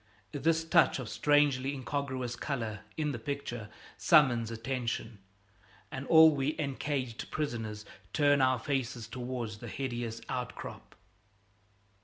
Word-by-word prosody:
This 160 +1 +1
touch 165 0 +4
of 130 -4 -5
strangely 145 +1 +2
incongruous 130 -2 -3
color 115 -7 -3 0.2
in 150 -2 0
the 120 - -4
picture 120 -4 -4 0.3
summons 125 -8 +5
attention, 115 -2 -3 0.7
and 130 +1 -5
all 160 -1 +8
we 140 +2 0
encaged 135 -4 -3
prisoners 110 -8 -3 0.3
turn 145 -2 +4
our 130 -1 +4
faces 125 -2 -2
towards 120 -3 -5
the 120 - -8
hideous 120 -2 -3
outcrop. 125 -1 -6
130 Hz, 115 wpm, -31 LUFS, 115-145 Hz, 0.7 s, all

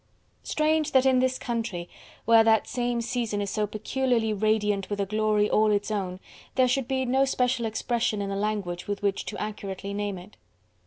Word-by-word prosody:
Strange 310 0 0
that 265 -1 +5
in 260 -1 +4
this 255 0 +1
country, 225 -8 -3 0.4
where 230 0 +6
that 220 -1 +4
same 240 -1 -1
season 230 -3 -2
is 200 -1 -2
so 210 -1 0
peculiarly 225 +1 0
radiant 210 -2 +1
with 205 -1 -3
a 200 - +1
glory 215 +1 +1
all 215 0 +3
its 205 +1 0
own, 185 -3 -3 0.4
there 255 -1 +4
should 250 0 0
be 260 -1 0
no 265 +2 +3
special 250 -3 +1
expression 220 -1 -1
in 200 -1 -3
the - - -2
language 200 -4 -2
with 205 0 -3
which 200 -1 0
to - - -5
accurately 200 -2 -5
name 205 -1 -2
it. 180 +4 -13
215 Hz, 190 wpm, -26 LUFS, 205-245 Hz, 0.4 s, where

